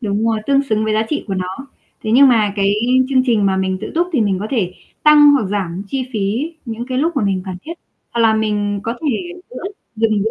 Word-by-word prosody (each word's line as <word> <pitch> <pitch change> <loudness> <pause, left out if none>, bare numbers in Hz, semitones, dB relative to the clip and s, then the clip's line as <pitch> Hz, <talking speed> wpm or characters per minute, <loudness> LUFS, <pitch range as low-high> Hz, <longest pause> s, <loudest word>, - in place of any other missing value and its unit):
Đúng 210 -1 -1
rồi, 225 -1 +1
tương 280 0 +3
xứng 220 -5 0
với 215 - 0
giá 215 +1 +2
trị 300 - -2
của 195 - -1
nó. 185 +9 -5 0.4
Thế 215 - -2
nhưng 275 +1 +7
mà 215 -4 +3
cái 200 0 +2 0.4
chương 265 -2 +3
trình 215 -4 +2
mà 190 -1 +1
mình 190 0 -1
tự - - -6
túc 345 +2 +2
thì 270 - +2
mình 195 -3 +1
có 210 - -3
thể 200 -9 0 0.3
tăng 295 -1 +7
hoặc 265 -7 +2
giảm 190 -2 -2
chi 270 -1 -2
phí 225 +10 -1
những 235 0 -5
cái 255 0 -1
lúc 325 +1 0
mà 215 - +1
mình 190 -2 0
cần 185 -2 -5
thiết, 330 - -6 0.4
hoặc 235 - -2
là 220 -1 +4
mình 205 -2 -1
có 230 - -2
thể 280 -8 0 0.3
giữa - - -8 0.3
dừng 215 -2 +1
giữa 220 - 0
220 Hz, 250 wpm, -18 LUFS, 200-260 Hz, 0.4 s, nhưng